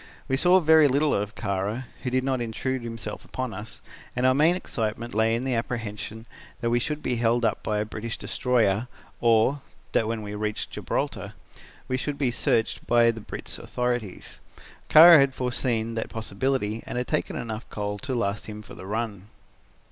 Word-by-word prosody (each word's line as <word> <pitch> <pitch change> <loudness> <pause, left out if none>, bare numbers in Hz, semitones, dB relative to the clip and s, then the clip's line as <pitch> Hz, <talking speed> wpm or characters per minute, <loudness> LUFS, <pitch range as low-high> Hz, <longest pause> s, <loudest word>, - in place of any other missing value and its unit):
We 135 - +1
saw 180 +6 +5
very 160 -2 +6
little 145 +2 +2
of 105 +1 -2
Kara, 105 +4 -2 0.2
who 130 - -2
did 130 +1 +1
not 130 -2 0
intrude 125 +3 -2
himself 115 -2 -6
upon 130 -3 -4
us, 105 +3 -8 0.3
and 125 +1 +1
our 130 - +5
main 155 +6 +4
excitement 115 -7 -3
lay 110 +1 +3
in 120 - -2
the 130 -1 0
apprehension 115 -1 -4 0.3
that 115 -2 -1
we 120 - +3
should 150 +4 -3
be 125 -2 0
held 120 +1 +2
up - - 0
by 105 - -1
a 105 - 0
British 110 +2 -5
destroyer 120 -3 +1 0.3
or, 115 +4 +3 0.3
that 110 - +2
when 115 -1 -2
we 105 0 -6
reached 105 0 -3
Gibraltar, - - -3 0.5
we 130 - 0
should 145 +2 -3
be 135 -4 +1
searched 115 -1 0
by 120 -1 +5
the 115 -1 -8
Brit's - - -6
authorities. 120 -6 -3 0.5
Kara 165 +1 +10
had 135 -1 +3
foreseen 120 -2 -1
that 115 - -3
possibility 115 0 -2
and - - -4
had 125 - -1
taken - - -1
in - - -3
enough 110 0 -6
coal 105 -1 -3
to 130 +2 -3
last 105 -3 -1
him 105 0 -7
for - - -12
the 95 - -10
run. 105 -2 -3
115 Hz, 185 wpm, -26 LUFS, 110-130 Hz, 0.5 s, Kara